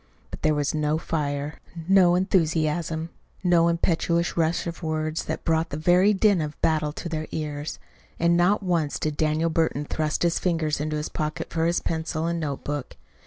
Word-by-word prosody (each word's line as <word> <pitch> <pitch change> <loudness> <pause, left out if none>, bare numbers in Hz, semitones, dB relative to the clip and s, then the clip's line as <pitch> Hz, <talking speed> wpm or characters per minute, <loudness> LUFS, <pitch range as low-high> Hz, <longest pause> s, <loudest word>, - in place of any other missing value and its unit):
But - - -8
there 155 -1 +2
was 145 -1 0
no 150 0 +1
fire, 145 -2 -3 0.3
no 185 -2 +5
enthusiasm, 165 -3 0 0.3
no 175 -2 +4
impetuous 170 0 +1
rush 165 0 +1
of 170 0 -5
words 155 -1 -2
that 160 - -4
brought 165 0 +1
the 145 - -4
very 180 +5 +4
din 200 -3 +3
of 150 -1 -5
battle 155 -2 +1
to 170 - -6
their 155 -1 -3
ears. 150 -1 -4 0.4
And 170 +1 +3
not 180 +4 +3
once 170 -5 0
did 155 -1 -2
Daniel 155 +2 +1
Burton 160 -3 0
thrust 155 +1 -1
his 170 -1 +2
fingers 160 -4 0
into 155 0 -2
his 150 - -3
pocket 155 0 -4
for 165 0 +1
his 170 - +1
pencil 160 0 -2
and 170 0 -1
notebook. 145 -2 -4
160 Hz, 175 wpm, -25 LUFS, 155-170 Hz, 0.4 s, no